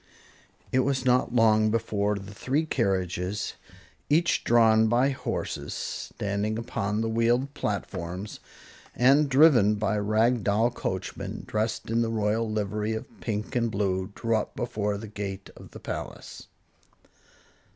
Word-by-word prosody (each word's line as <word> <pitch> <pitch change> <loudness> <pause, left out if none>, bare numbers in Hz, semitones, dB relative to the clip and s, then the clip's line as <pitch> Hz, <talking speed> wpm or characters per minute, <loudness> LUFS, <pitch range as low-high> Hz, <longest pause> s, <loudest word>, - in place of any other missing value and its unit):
It 130 - +3
was 130 0 0
not 125 -1 +2
long 110 -2 +4
before 105 -2 0
the 100 +1 -8
three 135 +10 -1
carriages, 95 - -1 0.6
each 160 +4 +2
drawn 110 -1 +5
by 120 +4 +3
horses 130 - -4
standing 105 +2 -3
upon 110 -1 -2
wheeled 120 +4 +1
platforms, 95 -2 -4 0.6
and 140 +4 +4
driven 130 -7 +6
by 105 0 0
rag 110 +3 +2
doll 110 +4 +2
coachmen - - -4
dressed 110 +1 -2
in 115 +1 +2
the 115 - 0
royal 110 0 0
livery 105 +1 -1
of 110 - -9
pink 110 +3 -3
and 120 -1 +1
blue 95 -2 -1
drew 115 -1 0
up 105 - -4
before 105 -4 -2
the 110 +2 -7
gate 100 -2 -6
of - - -13
the - - -11
palace. - - -7
110 Hz, 130 wpm, -27 LUFS, 105-120 Hz, 0.6 s, driven